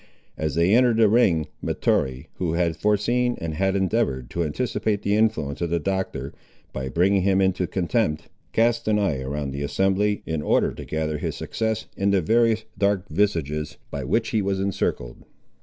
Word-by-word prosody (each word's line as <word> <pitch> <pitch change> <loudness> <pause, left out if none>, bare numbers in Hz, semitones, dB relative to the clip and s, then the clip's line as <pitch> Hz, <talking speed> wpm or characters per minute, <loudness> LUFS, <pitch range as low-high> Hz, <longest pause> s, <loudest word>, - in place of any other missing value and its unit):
As 75 -2 -2
they 85 +4 +3
entered 120 -1 +4
the 115 -1 +6
ring, 100 -8 +3 0.2
Mahtoree, 65 0 0
who 85 -3 -1
had 85 -1 +1
foreseen 120 +6 +1
and 80 -1 -4
had 95 +4 0
endeavoured 95 - 0
to 85 - -1
anticipate 105 +4 -1
the 100 - +1
influence 105 -11 0
of 85 - 0
the 85 - +1
Doctor, 95 +3 -3 0.4
by 65 0 -4
bringing 95 +6 +2
him 95 0 +2
into 95 -2 +1
contempt, 90 -4 -1 0.2
cast 115 0 +1
an 105 -1 +3
eye 90 -10 0
around 70 +1 -3
the 70 +1 -5
assembly, 95 +6 +1
in 80 -2 -2
order - - +2
to - - -8
gather 80 -1 -2
his - - -3
success 110 -1 -2
in 100 +1 +1
the 100 -1 +3
various 110 +4 +2
dark 100 -1 +1
visages 75 -5 -1
by 70 - -4
which 110 - 0
he 110 - +1
was 95 -1 -1
encircled. 95 -10 -2
95 Hz, 175 wpm, -24 LUFS, 80-105 Hz, 0.4 s, the